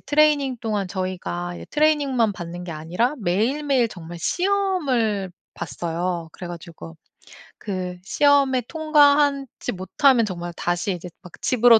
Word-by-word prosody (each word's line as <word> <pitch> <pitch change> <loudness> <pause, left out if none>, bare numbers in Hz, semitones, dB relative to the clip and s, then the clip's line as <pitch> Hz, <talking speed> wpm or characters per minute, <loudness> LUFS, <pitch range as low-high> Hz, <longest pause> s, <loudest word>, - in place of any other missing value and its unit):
트레이닝 290 -3 +3
동안 205 -4 -1
저희가 180 -2 -3
이제 - - -9
트레이닝만 285 -7 +2
받는 175 0 -7
게 170 - -5
아니라 175 - -1
매일매일 245 +7 +1
정말 170 -3 -9
시험을 285 - 0 0.2
봤어요. 170 0 -3
그래 180 - -8
가지고 165 -1 -9 0.6
그 185 -3 -4
시험에 275 +3 +3
통과하지 290 -5 +3
못하면 230 +7 +3
정말 175 -3 -5
다시 175 +3 -1
이제 180 0 -7
막 180 - -13
'집으로 240 -2 +6
215 Hz, 305 characters per minute, -23 LUFS, 175-280 Hz, 0.6 s, 집으로